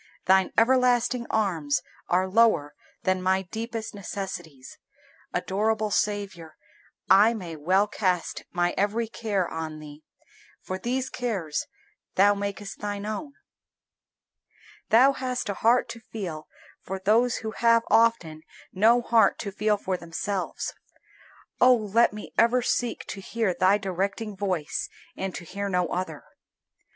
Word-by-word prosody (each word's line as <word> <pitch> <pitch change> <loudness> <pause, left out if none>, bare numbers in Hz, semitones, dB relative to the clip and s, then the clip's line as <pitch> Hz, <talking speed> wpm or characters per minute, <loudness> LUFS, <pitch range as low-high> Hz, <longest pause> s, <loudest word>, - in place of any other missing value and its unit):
Thine 190 0 +4
everlasting 245 0 +3
arms 170 -10 0 0.3
are 185 +1 +2
lower 190 -8 +3 0.3
than 185 -1 +1
my 190 +1 +1
deepest 225 +3 -5
necessities. 175 -9 -7 0.5
Adorable 215 +2 0
Saviour, 195 -7 -2 0.5
I 210 +5 +6
may 175 -6 -6
well 185 +7 +2
cast 185 -5 -1
my 175 0 0
every 215 +3 0
care 210 -5 -2
on 160 -1 -5
Thee, 150 0 -12 0.6
for 185 0 -5
these 255 +5 -1
cares 205 -12 -3 0.5
Thou 200 +2 +5
makest 200 0 -5
Thine 205 0 -4
own. 250 +7 -5 1.6
Thou 250 +5 +6
hast 255 -4 -3
a - - 0
heart 240 +2 +4
to 230 - -7
feel 185 -9 -7 0.3
for 190 - -5
those 225 +6 +2
who 220 - -2
have 230 0 +3
often 225 -9 +3 0.3
no 230 +5 +4
heart 230 -1 +4
to 200 - -5
feel 210 +1 +1
for 190 -2 -2
themselves. 180 +3 -4 0.9
Oh 250 0 +7
let 225 +1 +2
me 210 0 -9
ever 235 +2 +4
seek 245 -1 -1
to 195 - -7
hear 220 -1 -1
Thy 185 +3 +3
directing 195 +2 -3
voice 185 -6 -2 0.3
and 190 -1 -4
to - - -6
hear 200 +3 -4
no 180 -2 +1
other. 185 +1 -4
200 Hz, 130 wpm, -26 LUFS, 185-230 Hz, 1.6 s, Oh